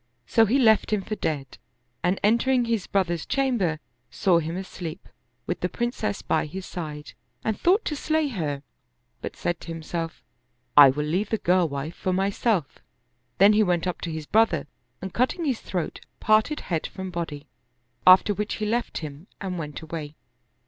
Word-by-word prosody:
So 225 - +4
he 245 +7 +3
left 220 -6 +4
him 210 -2 +1
for 215 - -5
dead, 140 -8 -3 0.4
and 180 +2 +1
entering 240 +4 +3
his 230 -4 -1
brother's 175 -4 0
chamber, 235 - 0 0.3
saw 180 -3 +3
him 165 +2 -3
asleep, 180 -4 -7 0.4
with - - -2
the 180 - -1
Princess 225 -3 -2
by - - +1
his 185 +5 -7
side, 150 -4 -6 0.3
and 220 - 0
thought 375 - +2
to 300 - -1
slay 310 0 0
her, 150 - -3 0.6
but - - -5
said 175 -1 -2
to - - -11
himself, 165 0 -5 0.3
" 120 0 -46
I 145 -2 +10
will 150 +3 -1
leave 180 +7 0
the 220 - +1
girl 180 -3 +2
wife 140 +4 -4
for 185 - -1
myself." 195 - 0 0.6
Then 200 +2 +7
he 215 - +4
went 180 -4 +1
up 180 -2 -3
to 170 - -3
his 160 -1 -5
brother 210 -6 +3 0.4
and 190 - -5
cutting 260 +8 0
his 260 -6 0
throat, 175 -4 -4 0.2
parted 215 +8 +3
head 165 -3 -2
from 190 -1 -7
body, 160 -4 -5 0.6
after 185 +3 +8
which 210 +2 -2
he 215 - -3
left 235 +3 -1
him 150 +5 -9
and 185 -3 -4
went 150 -1 -6
away. 155 -2 -6
185 Hz, 175 wpm, -25 LUFS, 160-220 Hz, 0.6 s, I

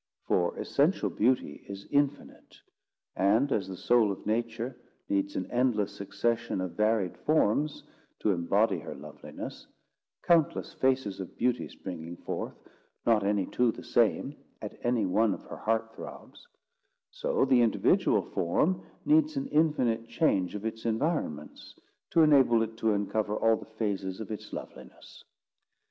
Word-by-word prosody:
For 85 -1 +1
essential - - +1
beauty 120 - 0
is 100 0 -7
infinite; 145 0 -1 0.6
and, 110 +9 +3
as 95 -3 0
the 95 -1 -7
soul 115 -1 +3
of 95 - -7
Nature 115 +3 -2 0.3
needs 295 0 0
an - - -1
endless 110 -5 +1
succession 115 +1 -1
of 95 -1 -3
varied 105 0 +1
forms 150 0 +1 0.4
to 105 - +2
embody 100 +5 +2
her - - -8
loveliness, 75 +2 -9 0.6
countless 165 -3 +2
faces 130 -7 0
of 95 - -8
beauty 125 0 0
springing 85 -2 -7
forth, - - -5 0.5
not 110 -3 +4
any 100 -1 +1
two 120 +3 +1
the - - -10
same, - - +1 0.2
at - - -7
any 120 -3 +1
one 105 +2 +2
of - - -13
her - - -9
heart 115 0 -1
throbs; - - -11 0.6
so - - 0
the 125 -2 +4
individual 115 -2 +3
form 160 - 0 0.2
needs 305 -1 +3
an 275 - -1
infinite 125 - +1
change 100 - +1
of 105 +1 -5
its 110 0 -4
environments, 115 - -2 0.3
to 165 - +5
enable 135 -7 +5
it 110 0 -5
to 110 -1 +1
uncover 105 +1 -1
all 115 +1 +3
the - - -10
phases 95 -3 -2
of 110 -1 -6
its 105 - -7
loveliness. - - -10
115 Hz, 145 wpm, -29 LUFS, 100-130 Hz, 0.6 s, to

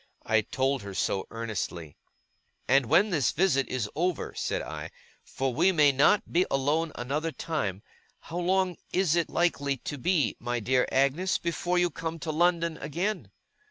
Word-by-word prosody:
I 110 0 +3
told 135 +4 -1
her 100 -1 -8
so, 95 0 -1
earnestly. 100 -9 -5 0.7
'And 135 -1 +4
when 210 - +4
this 145 -8 +2
visit 150 -6 +2
is 125 -5 -2
over,' 175 +1 -1
said - - -2
I, - - -6 0.3
'for 135 -1 -3
we 190 +10 +4
may 150 -5 +5
not 145 +10 +3
be 175 +2 +4
alone 150 +4 +1
another 145 +7 -2
time, 105 - -3 0.4
how 170 - -5
long 185 0 +1
is 180 -3 +2
it 170 -1 +1
likely 140 -5 0
to 145 +3 -6
be, 145 - +1
my 120 0 -2
dear 125 +3 +1
Agnes, 140 +8 +2
before 175 +1 -1
you 175 -1 +2
come 165 +1 -4
to 160 0 -4
London 170 0 +1
again? 180 +8 -3
150 Hz, 160 wpm, -28 LUFS, 130-175 Hz, 0.7 s, may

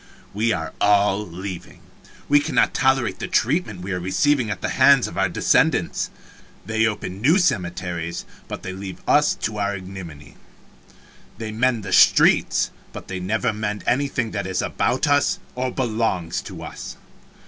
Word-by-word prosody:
We 110 +3 +1
are - - -3
all 100 0 +3
leaving. 90 -1 -8 0.5
We 145 0 +5
cannot 145 - +1
tolerate 130 -7 +1
the - - -4
treatment 120 - 0
we 95 +2 -5
are 90 - -1
receiving 120 +7 +1
at 100 -4 -4
the - - -2
hands 135 0 +5
of 85 - -9
our 95 0 +1
descendants. 85 - +1 0.6
They 110 +2 +1
open 100 -3 -4
new 155 +10 +4
cemeteries, 90 - -1 0.2
but - - -7
they 95 - -5
leave 95 0 -7
us - - +4
to 105 -1 -4
our 100 0 0
ignominy. 90 -7 -10 1.0
They 110 -1 -5
mend 115 0 +1
the 95 - -3
streets, - - +4 0.2
but - - -10
they 95 -1 -4
never 110 +4 -1
mend 105 -1 -3
anything 125 -3 0
that 100 -2 -3
is 95 -1 -1
about 130 - 0
us 145 0 +3 0.2
or 130 +1 -2
belongs 110 -9 -1
to - - -8
us. - - -8
105 Hz, 160 wpm, -22 LUFS, 95-125 Hz, 1.0 s, We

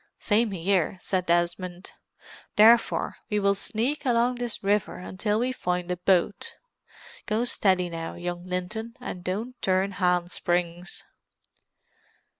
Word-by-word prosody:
"Same 220 +2 +2
here," 190 -1 0
said 185 -1 -1
Desmond. 175 +2 0 0.6
"Therefore 225 +2 +5
we 210 -2 +1
will 200 0 +3
sneak 235 +9 -1
along 245 -1 +2
this 245 -4 -4
river 205 +1 +1
until 190 +3 -2
we 245 +3 0
find 180 -7 -2
a 180 - -1
boat. 185 +2 +1 0.7
Go 220 +3 +1
steady 185 -6 +2
now, 165 -1 -5
young 175 0 -4
Linton, 185 +6 -4
and 180 - -6
don't 220 +8 -4
turn 190 +1 +2
hand 180 -2 +1
springs!" 175 +1 -2
190 Hz, 125 wpm, -26 LUFS, 180-220 Hz, 0.7 s, Therefore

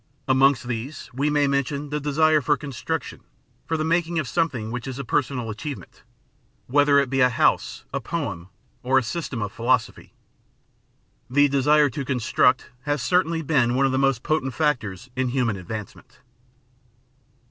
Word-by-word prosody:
Amongst 135 -1 +3
these 125 +4 -5
we 140 +4 0
may 145 -1 +2
mention 140 +1 -1
the 150 - -1
desire 155 +1 +3
for 145 +2 +2
construction, 150 +3 -5 0.5
for 160 - 0
the 155 - -1
making 170 +1 0
of 155 -5 -1
something 125 -9 -1
which 125 +1 -5
is 130 -1 -5
a 140 - -5
personal 125 -2 -1
achievement, 135 +6 -8 0.6
whether 145 +2 +4
it 140 -1 +3
be 135 +1 0
a 125 - +6
house, 120 - +1
a 140 - 0
poem, 110 - -4 0.3
or 130 +2 +2
a 130 - +3
system 130 -4 -4
of 105 - -4
philosophy. 120 +1 -1 1.1
The 145 +3 +4
desire 145 +1 +3
to 140 - -4
construct 125 -4 +1
has 145 0 -1
certainly 165 -2 +1
been 130 -5 +2
one 135 +1 +3
of 135 - +1
the 130 - 0
most 135 -4 +1
potent 135 -5 -1
factors 125 - -1
in 130 0 0
human 120 -4 0
advancement. 100 +2 -8
135 Hz, 160 wpm, -24 LUFS, 125-150 Hz, 1.1 s, a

